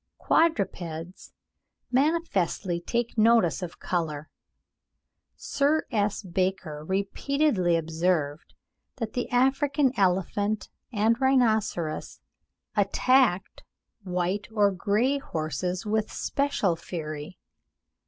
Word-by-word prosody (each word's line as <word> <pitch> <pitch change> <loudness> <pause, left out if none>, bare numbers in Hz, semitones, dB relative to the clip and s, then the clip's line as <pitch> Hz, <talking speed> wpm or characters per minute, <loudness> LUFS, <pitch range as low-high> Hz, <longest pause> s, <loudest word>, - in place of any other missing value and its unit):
Quadrupeds 185 - -1 0.6
manifestly 250 - +1
take 235 +4 -2
notice 225 -6 +4
of 175 -2 -6
colour. 155 -4 -3 1.0
Sir 290 +3 0
S. 210 -2 0
Baker 185 -4 -2
repeatedly 195 - +1
observed 160 -2 -1 0.4
that 225 -4 -4
the 245 - -2
African 270 +2 +2
elephant 200 +3 0 0.2
and 225 +2 +1
rhinoceros 220 -11 +1 0.6
attacked 210 0 +2 0.4
white 180 +2 -2
or 205 -2 +3
grey 215 +9 +1
horses 180 - -3
with 215 0 0
special 275 - 0
fury. 155 -1 -6
200 Hz, 85 wpm, -27 LUFS, 175-245 Hz, 1.0 s, notice